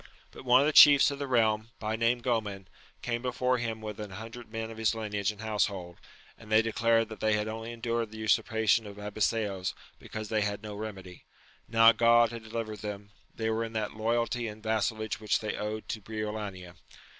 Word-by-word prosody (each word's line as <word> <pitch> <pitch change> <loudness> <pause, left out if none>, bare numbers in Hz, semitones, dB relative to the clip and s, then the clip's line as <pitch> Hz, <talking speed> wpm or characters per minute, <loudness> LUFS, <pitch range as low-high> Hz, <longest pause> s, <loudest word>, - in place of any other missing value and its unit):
But - - -12
one 125 +1 +6
of - - +2
the 155 - +1
chiefs 145 -1 +9
of 140 - -6
the 140 - -3
realm, 110 -3 +2
by 110 0 -2
name 120 +1 +1
Groman, 105 -6 -1 0.4
came 120 -1 -2
before 125 0 0
him 115 -2 -3
with 105 -1 -6
an 105 -1 -6
hundred 110 +4 -9
men 115 0 -4
of 110 - -10
his 110 0 +2
lineage 105 -2 -2
and 105 0 -12
household, 100 -5 -2 0.4
and 110 -1 -13
they 110 +1 +5
declared 115 0 +2
that 110 - -9
they 110 0 +2
had 105 0 0
only 115 +1 -5
endured 115 -1 -2
the 110 - -11
usurpation 110 0 +2
of 100 0 -10
Abiseos 105 -2 -1 0.2
because 110 -1 -7
they 110 -1 +1
had 100 +1 -2
no 105 -1 -6
remedy: 100 -4 -8 0.4
now 115 0 +7
God 115 0 +4
had 115 -1 -7
delivered 110 -1 -5
them, 105 -1 -7 0.2
they 110 0 -1
were 110 +1 0
in 115 0 -6
that 110 -2 -2
loyalty 115 +2 0
and 105 0 -9
vassallage 110 0 -1
which 105 -1 +1
they 110 -1 -4
owed 110 +1 -4
to 110 - -3
Briolania. 105 -4 -6
110 Hz, 200 wpm, -29 LUFS, 105-115 Hz, 0.4 s, chiefs